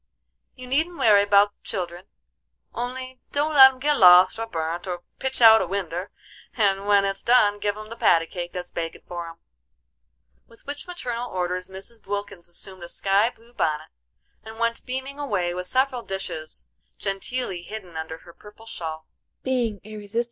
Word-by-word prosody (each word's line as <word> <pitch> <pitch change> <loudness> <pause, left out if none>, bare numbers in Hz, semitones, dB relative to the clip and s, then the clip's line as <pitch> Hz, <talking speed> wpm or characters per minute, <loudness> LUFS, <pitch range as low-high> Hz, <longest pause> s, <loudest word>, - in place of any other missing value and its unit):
You 255 - -9
needn't 315 +7 0
werry 210 -3 +6
about 205 0 +4
the - - -53
children, 175 -3 -4 0.7
only 255 +1 -5
don't 295 +2 +1
let 265 -2 +10
'em 260 - -16
git 295 +2 +2
lost, 180 +3 +7
or 225 - -3
burnt, 165 -2 -3
or 175 -1 -4 0.2
pitch 265 -2 -1
out 220 -1 +9
a 185 - -1
winder; 185 -1 -3 0.5
and 200 -2 +2
when 200 -1 +5
it's 195 0 +1
done 210 -4 +4
give 205 0 -1
'em 215 0 -9
the 230 - -7
patty 165 -7 +4
cake 175 +1 -6
that's 180 -1 -6
bakin' 165 -1 -5
for 175 -1 -5
'em." 165 - -11 1.1
With 230 - -21
which 290 +4 -6
maternal 245 -9 -4
orders 180 0 -2
Mrs. 195 +3 -9
Wilkins 200 -4 -5
assumed 185 +1 -5
a 170 - -8
sky 200 +5 +2
blue 235 0 -20
bonnet, 155 -7 -1 0.5
and 220 0 -10
went 230 0 -1
beaming 265 +2 -4
away 195 -11 -1
with 180 0 -4
several 260 +2 +1
dishes 190 -7 -5 0.3
genteelly 195 0 -3
hidden 185 -2 -9
under 160 0 -5
her 170 - -13
purple 210 +4 -15
shawl. 160 -7 -6
200 Hz, 165 wpm, -24 LUFS, 180-240 Hz, 1.1 s, let